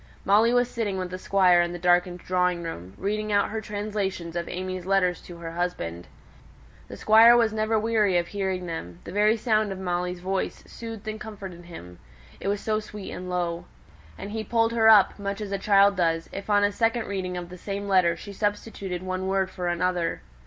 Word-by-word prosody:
Molly 215 +4 +5
was 245 0 +3
sitting 220 -5 -3
with 185 -1 -4
the 185 - -5
Squire 185 -3 +4
in 175 0 -1
the - - -4
darkened 175 0 +2
drawing 180 -1 0
room, 95 - -7
reading 215 +2 -2
out 205 0 +2
her 220 0 -3
translations 205 -5 -4
of 170 0 -2
AimÄe's 185 0 -5
letters 185 -2 +2
to 175 - -11
her 165 -1 -7
husband. 125 - -3 0.8
The - - -9
Squire 225 +2 +7
was 225 -2 +2
never 220 +1 +1
weary 215 -4 +2
of 175 0 -1
hearing 190 -2 -2
them; 90 - -6
the - - -8
very 210 +3 +3
sound 215 -2 +1
of 190 - -5
Molly's 180 -1 -2
voice 190 +1 -3
soothed 225 -2 -9
and 215 0 -5
comforted 190 -5 -8
him, 90 - -11 0.4
it - - -5
was 200 0 0
so 215 -1 0
sweet 210 -2 -8
and 180 0 -6
low. 175 -1 -2 0.5
And 205 - -7
he 220 0 -3
pulled 225 0 +1
her 225 -1 +5
up, 205 -2 +6
much 200 0 -3
as 210 -2 -5
a 200 - -1
child 200 0 +4
does, 165 -2 +1
if 195 +2 -7
on 205 -1 +4
a 205 - +3
second 225 +2 0
reading 185 -2 -3
of 175 -1 -6
the 180 - -10
same 200 +1 -4
letter 180 -3 +3
she 200 +2 -9
substituted 200 -3 -3
one 185 0 -3
word 190 -1 0
for 180 -1 -4
another. 175 0 -1
195 Hz, 205 wpm, -26 LUFS, 180-210 Hz, 0.8 s, Squire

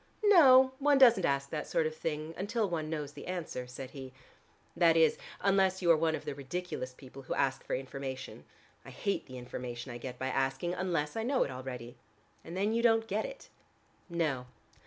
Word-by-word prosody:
"No, 265 -10 +7
one 285 0 +4
doesn't 235 -8 +6
ask 140 0 -1
that 150 -1 -3
sort 165 - +1
of 155 0 -2
thing 155 0 -4
until 215 +2 -1
one 160 -4 -3
knows 150 -3 -3
the - - -10
answer," 170 -8 -4
said 125 +1 -8
he. 130 -2 -9 0.6
"That 165 -2 +5
is, 160 -1 +4 0.2
unless 190 -1 +2
you 170 - +6
are - - +7
one 160 0 +1
of - - -8
the - - -3
ridiculous 140 -1 -5
people 130 +1 -12
who 130 - -4
ask 135 0 0
for - - -2
information. 130 0 -6 0.4
I - - -11
hate 200 -1 -2
the 130 - -9
information 125 0 -6
I 120 - -7
get 125 0 -7
by 130 +1 -2
asking, 135 +6 -1
unless 175 -5 -1
I 225 - -1
know 255 +3 +2
it 140 - -5
already." 125 -2 -7 0.5
"And 170 +3 -7
then 205 +3 +1
you 230 - +1
don't 225 -1 +4
get - - -1
it." - - -9 0.6
"No. 150 -7 -1
155 Hz, 200 wpm, -31 LUFS, 130-195 Hz, 0.6 s, No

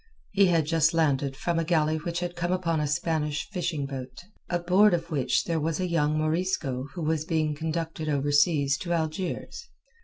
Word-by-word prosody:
He 200 -1 +4
had 165 -3 +2
just 160 +1 +2
landed 140 -4 +1
from 170 +1 -1
a - - +1
galley 160 -2 +1
which 170 +2 -3
had 175 0 -3
come 175 +1 -2
upon 170 -3 0
a 150 - 0
Spanish 150 -1 -1
fishing 170 -7 -2
boat, 135 +2 -7 0.3
aboard 180 +3 +4
of 170 0 -5
which 140 -5 +1
there 165 -1 -1
was 155 +1 -1
a 185 - 0
young 155 -3 +1
Morisco 155 -5 -1
who 170 - -4
was 155 0 0
being 160 -2 0
conducted 160 0 -3
over 145 0 0
seas 145 -2 +3
to 175 -1 -2
Algiers. 170 - -3
160 Hz, 185 wpm, -27 LUFS, 150-175 Hz, 0.3 s, He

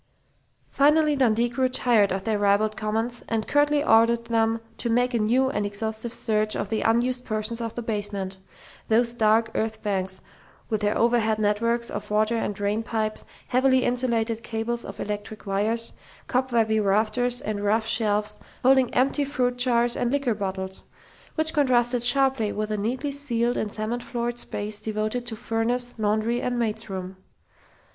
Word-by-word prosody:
Finally 300 +1 +4
Dundee 240 -3 +2
grew 255 +2 0
tired 230 -6 +3
of 190 +1 -2
their 215 0 0
ribald 205 +1 +2
comments 225 +3 -2
and 225 -2 -1
curtly 290 0 +3
ordered 230 -1 +4
them 225 -1 +1 0.2
to 235 - -1
make 245 +2 +2
a 235 - +1
new 250 +5 +2
and 210 - -1
exhaustive 220 +3 -3
search 215 -2 0
of 200 - -3
the 220 - -1
unused 245 +2 +1
portions 215 +1 -3
of 230 -1 -4
the 240 - -4
basement 205 -3 -3 0.5
those 235 +1 +2
dark 225 0 +2
earth 220 0 -2
banks, 190 -2 -1 0.5
with 215 -1 -1
their 210 +1 +1
overhead 230 -2 +2
networks 230 +3 0
of - - -5
water 215 +2 +2
and 215 -2 -2
drain 205 +2 -1
pipes, 220 -1 -2 0.2
heavily 260 0 +3
insulated 235 -2 0
cables 235 +1 -3
of - - -9
electric 210 +1 -5
wires, 215 +4 0 0.3
cobwebby 235 -4 +1
rafters 220 +5 +1
and 210 -3 -3
rough 220 +2 +2
shelves 210 -1 +1 0.2
holding 260 -1 +4
empty 270 +3 +2
fruit 255 -3 0
jars 240 -1 +3
and 245 - -1
liquor 280 -4 +1
bottles 190 -2 -4 0.5
which 315 0 0
contrasted 250 -5 +2
sharply 255 -3 +3
with 215 0 -3
the 215 - -1
neatly 250 +7 -2
ceiled 245 -4 0
and 210 - -2
cement 220 +3 -3
floored 240 -1 -3
space 210 -1 -4
devoted 215 +3 -2
to 225 - -3
furnace, 240 +2 -1
laundry 215 +3 0
and 245 -1 -1
maid's 225 -1 -2
room. 190 0 -6
225 Hz, 160 wpm, -25 LUFS, 215-245 Hz, 0.5 s, Finally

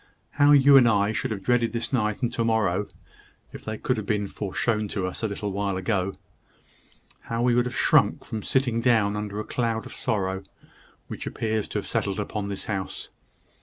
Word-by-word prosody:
How 145 0 +4
you 140 -1 +8
and 125 -3 +6
I 105 -2 +3
should - - -2
have 100 -3 -4
dreaded 120 0 +2
this 115 +3 -3
night 105 -1 0
and 120 0 0
to 115 - 0
morrow, 105 -4 +1 0.7
if - - -9
they 110 0 -4
could 125 - -1
have 110 - -4
been 105 -1 0
foreshown 105 +2 -1
to 100 -2 -2
us 95 - -5
a 105 -1 -3
while 100 -1 -1
ago! 95 0 -1 1.1
How 115 +1 -2
we 125 -1 +3
should 120 +1 +3
have 125 - -6
shrunk - - +3
from 110 - -4
sitting 125 -1 +1
down 110 -4 +3
under 105 -1 -4
the 105 - -2
cloud 115 -2 -2
of - - -9
sorrow 95 -5 -1 0.7
which - - -6
appears 110 -1 -2
to - - -4
have - - -3
settled 100 0 -1
upon 105 0 -3
this 100 - -5
house! 95 -3 -4
110 Hz, 195 wpm, -25 LUFS, 100-115 Hz, 1.1 s, you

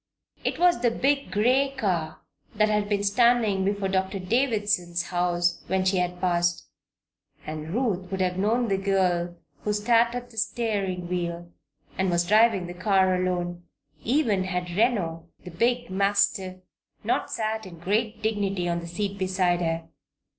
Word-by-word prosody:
It - - -1
was 350 -7 +3
the 245 - +4
big 275 +4 0
gray 260 +6 +2
car 170 -9 -1 0.3
that 215 0 +3
had 210 -1 0
been 205 -1 0
standing 220 -2 +3
before 200 0 0
Doctor 190 +1 -1
Davison's 205 -5 0
house 175 -1 0
when 190 0 0
she 190 0 +2
had 180 0 -1
passed, 175 -1 0 0.8
and 155 0 -6
Ruth 195 -5 -1
would 190 - -3
have 180 -1 +1
known 230 +4 +1
the 195 -2 0
girl 180 -3 +1 0.2
who 210 - -2
sat 235 +3 +2
at 245 0 -6
the 225 - -17
steering 205 -5 -1
wheel 175 -1 -3 0.5
and 190 0 +2
was 175 0 +1
driving 215 -1 +4
the 175 - -7
car 190 0 +2
alone, 175 -1 -2 0.4
even 225 -7 +1
had 180 -1 -3
Reno, 175 -6 0 0.2
the 180 - -8
big 240 +6 0
mastiff, 195 -1 +1 0.5
not - - 0
sat 220 -2 -2
in 170 -2 -11
great 215 +6 -1
dignity 200 -4 -1
on 170 0 0
the 170 - -8
seat 200 +3 -4
beside 185 -2 +1
her. 165 -1 -2
190 Hz, 155 wpm, -26 LUFS, 175-220 Hz, 0.8 s, the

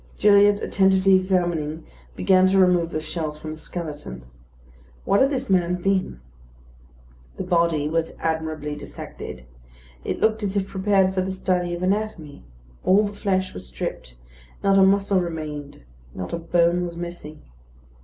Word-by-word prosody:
Gilliatt, 205 0 +5
attentively 190 0 +3
examining, 175 -5 0 0.3
began 185 - +4
to 195 +1 +2
remove 180 -3 +4
the 155 - -3
shells 155 -1 -4
from 155 0 -6
the 155 - -7
skeleton. 150 - -7 0.8
What 200 - +3
had 270 - +5
this 265 -2 -2
man 180 -2 +1
been? 185 - 0 1.2
The - - -3
body 170 -4 +1
was 165 +1 -1
admirably 160 -2 -3
dissected; 65 - -9 0.6
it - - -3
looked 220 0 +2
as 200 -1 -2
if 195 -1 -1
prepared 190 -1 +2
for 185 - 0
the 185 - -3
study 180 -2 -1
of 175 - -6
anatomy; 190 -6 -2 0.4
all 195 +3 +4
the 205 - -5
flesh 190 -2 -1
was 90 - -8
stripped; 60 0 -6 0.5
not 195 0 +4
a - - +7
muscle 195 0 +3
remained; 150 - -6 0.3
not 90 - -6
a 170 - -2
bone 170 +1 +2
was 170 -1 -5
missing. 170 -3 -8
180 Hz, 150 wpm, -23 LUFS, 155-195 Hz, 1.2 s, a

